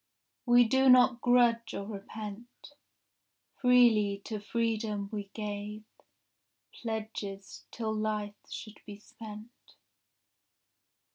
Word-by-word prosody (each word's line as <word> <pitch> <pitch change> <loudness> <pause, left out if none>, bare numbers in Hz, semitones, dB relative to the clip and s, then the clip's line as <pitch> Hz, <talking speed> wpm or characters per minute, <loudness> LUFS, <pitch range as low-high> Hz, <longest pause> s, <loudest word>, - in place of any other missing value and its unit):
We 245 0 +7
do 265 +3 +3
not 250 -1 +6
grudge 235 -2 +3
or 200 - -4
repent. 215 +5 -9 0.8
Freely 235 -6 +4
to 215 -2 -4
freedom 215 -2 -2
we 205 -2 -4
gave 210 0 -5 0.9
Pledges, 215 -3 -6
till 220 -2 -3
life 215 -1 -2 0.2
should 215 -1 -8
be 205 -1 -8
spent. 215 +1 -11
220 Hz, 90 wpm, -30 LUFS, 210-235 Hz, 0.9 s, We